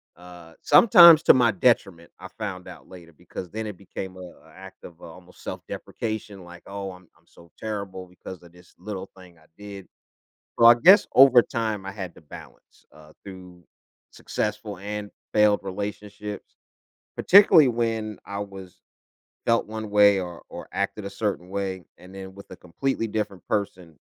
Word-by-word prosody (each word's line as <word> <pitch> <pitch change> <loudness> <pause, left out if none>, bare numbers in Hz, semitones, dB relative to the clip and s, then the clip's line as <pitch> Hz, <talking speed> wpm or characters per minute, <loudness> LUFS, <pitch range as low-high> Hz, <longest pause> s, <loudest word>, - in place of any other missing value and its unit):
uh, 90 -1 -15
sometimes 170 -7 +8
to - - +7
my 120 -3 +3
detriment, 95 -5 0
I 95 +1 -10
found 95 -4 -7
out - - -14
later, 85 -3 -14
because 90 +3 -10
then 110 0 -5
it 105 - -7
became 95 -1 -8
a - - -10
a 85 -2 -14
act 95 0 -14
of, 85 -1 -14
uh, - - -11
almost 90 +2 -16
self-deprecation, 110 -4 -7
like, 90 0 -14
"Oh, 100 -1 -6
I'm 90 -1 -18
I'm - - -33
so 85 0 -20
terrible 100 -4 -6
because 90 0 -12
of 85 - -17
this 90 0 -20
little 95 0 -7
thing 90 -2 -17
I 80 - -25
did." 100 -3 -11 0.7
So 115 - +4
I 120 - +9
guess 185 - +6
over 130 -2 +7
time 110 -4 -4
I 95 - -6
had 95 -4 -8
to - - -15
balance, 75 - -15
uh, 75 0 -18
through 90 -2 -13 0.5
successful 105 -2 -5
and 105 +1 -6 0.2
failed 105 -1 +3
relationships, 105 +1 -7 0.6
particularly 185 -6 +6
when 115 -3 -3
I 100 0 -6
was 95 -2 -10 0.7
felt 115 0 +1
one 110 0 -7
way 100 -1 +4
or 90 -2 -8
or - - -10
acted 105 - -3
a 100 - -5
certain 100 -3 -4
way, 95 -2 -5
and 90 +1 -16
then 95 0 -10
with 100 - -14
a - - -8
completely 115 +7 -3
different 105 -3 -4
person, 90 -6 -4
100 Hz, 170 wpm, -24 LUFS, 90-110 Hz, 0.7 s, I